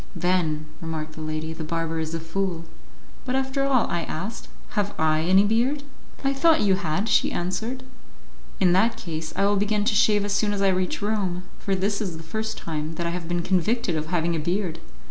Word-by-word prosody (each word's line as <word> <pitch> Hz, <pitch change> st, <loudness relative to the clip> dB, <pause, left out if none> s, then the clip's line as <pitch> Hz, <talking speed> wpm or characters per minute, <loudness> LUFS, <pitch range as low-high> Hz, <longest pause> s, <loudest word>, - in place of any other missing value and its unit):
"Then," 170 Hz, -4 st, +1 dB, 0.2 s
remarked 160 Hz, -1 st, -4 dB
the 155 Hz, -, -8 dB
lady, 155 Hz, +1 st, -3 dB
"the 160 Hz, -, -6 dB
barber 165 Hz, 0 st, -2 dB
is 160 Hz, +1 st, -2 dB
a -, -, -2 dB
fool." 170 Hz, +1 st, -2 dB, 0.6 s
"But 255 Hz, 0 st, -1 dB
after 265 Hz, +1 st, 0 dB
all," 265 Hz, -4 st, +3 dB
I 170 Hz, -, -1 dB
asked, 195 Hz, +9 st, -5 dB, 0.2 s
"have 205 Hz, -1 st, -1 dB
I 155 Hz, 0 st, +3 dB
any 190 Hz, +4 st, +5 dB
beard?" 240 Hz, +7 st, +1 dB, 0.4 s
"I 275 Hz, 0 st, +2 dB
thought 320 Hz, +3 st, +4 dB
you 200 Hz, -2 st, +4 dB
had," 185 Hz, +2 st, 0 dB
she 215 Hz, -, +3 dB
answered. 220 Hz, +9 st, -2 dB, 0.8 s
"In 180 Hz, -2 st, +4 dB
that 225 Hz, +5 st, +3 dB
case, 160 Hz, -6 st, -5 dB
I 195 Hz, -, +2 dB
will 205 Hz, 0 st, +3 dB
begin 205 Hz, +1 st, +1 dB
to 215 Hz, -, +3 dB
shave 210 Hz, -1 st, +4 dB
as 205 Hz, -, -1 dB
soon 205 Hz, 0 st, +2 dB
as 200 Hz, -, -1 dB
I 195 Hz, -, +5 dB
reach 185 Hz, +1 st, 0 dB
Rome, 195 Hz, -4 st, 0 dB, 0.2 s
for 195 Hz, -2 st, 0 dB
this 200 Hz, +3 st, 0 dB
is 180 Hz, -6 st, -3 dB
the 160 Hz, -, -9 dB
first 220 Hz, +6 st, -3 dB
time 155 Hz, 0 st, -4 dB
that 170 Hz, -, -3 dB
I 170 Hz, -, 0 dB
have 170 Hz, -1 st, -4 dB
been 175 Hz, 0 st, -1 dB
convicted 190 Hz, +1 st, +1 dB
of 155 Hz, 0 st, -2 dB
having 170 Hz, 0 st, +1 dB
a -, -, -1 dB
beard." 175 Hz, +2 st, -1 dB
185 Hz, 210 wpm, -25 LUFS, 165-210 Hz, 0.8 s, any